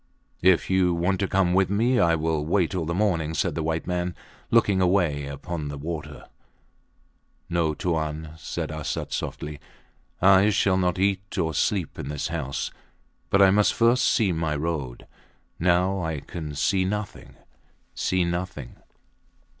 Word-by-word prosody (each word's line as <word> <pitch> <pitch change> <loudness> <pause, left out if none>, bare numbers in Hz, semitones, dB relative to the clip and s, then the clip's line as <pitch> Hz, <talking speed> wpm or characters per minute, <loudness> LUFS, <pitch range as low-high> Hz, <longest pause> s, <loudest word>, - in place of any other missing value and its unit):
If 95 -1 +4
you 95 -2 +2
want 90 +3 0
to 100 - 0
come 95 -2 +2
with 95 0 +3
me, 120 +5 +2
I 85 -1 +4
will 80 -1 -1
wait 85 +3 +1
all 90 -3 -1
the 85 - -2
morning, 85 -6 0
said - - 0
the 80 - -3
white 80 +1 -2
man, 90 0 -2 0.3
looking 105 -5 +3
away 85 -6 +1
upon 75 +2 -5
the 70 0 -5
water. 75 0 -6 1.3
No, 85 -3 +1
Tuan, 80 -2 -2
said 80 - -5
Arsat, 75 -1 -4
softly. 75 -1 -4 0.6
I 95 +2 +6
shall 100 -2 +2
not 90 -1 +1
eat 100 +1 -1
or 80 -3 0
sleep 90 +3 -1
in 70 - -5
this 75 +2 -3
house, 75 -5 -3 0.6
but 100 +1 +5
I 95 - +6
must 105 +1 +3
first 120 +2 +3
see 105 -5 +3
my 80 -2 -1
road. 75 -5 -3 0.5
Now 90 +2 +2
I 80 -3 -3
can 75 -1 -7
see 95 +5 +1
nothing 105 +2 -4 0.6
see 95 -1 0
nothing! 85 -6 -4
85 Hz, 155 wpm, -25 LUFS, 80-95 Hz, 1.3 s, I